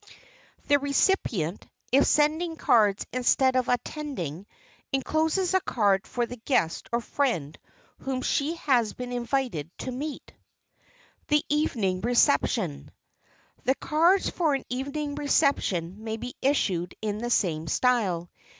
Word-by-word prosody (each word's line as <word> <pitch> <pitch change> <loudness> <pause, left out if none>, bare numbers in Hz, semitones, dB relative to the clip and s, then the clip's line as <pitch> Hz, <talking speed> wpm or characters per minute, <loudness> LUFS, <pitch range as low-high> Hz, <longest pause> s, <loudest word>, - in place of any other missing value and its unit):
The 285 0 +4
recipient, 270 - 0 0.2
if 275 +3 +5
sending 315 +3 +2
cards 210 -9 +3
instead 255 +1 +3
of 255 0 +1
attending, 240 - -3 0.4
encloses 315 +7 0
a 375 - +5
card 200 - +1
for 240 -1 -1
the 245 +1 -8
guest 220 - -1
or 235 0 0
friend 230 - -1 0.4
whom 260 -1 -3
she 300 +4 0
has 250 -9 +1
been 250 0 -6
invited 245 - -2
to 255 - -5
meet. 280 +4 -6
[Sidenote: - - -35
THE 295 0 +2
EVENING 220 -11 0
RECEPTION] 235 - +1 0.8
The 265 - +3
cards 340 +8 +2
for 315 -5 +1
an 270 - -4
evening 280 +4 -3
reception 215 - 0
may 220 0 -3
be 250 +3 -6
issued 185 -11 0
in 210 -1 -2
the 240 +1 -3
same 165 -8 0
style. 190 -6 +1
250 Hz, 130 wpm, -26 LUFS, 205-290 Hz, 0.8 s, if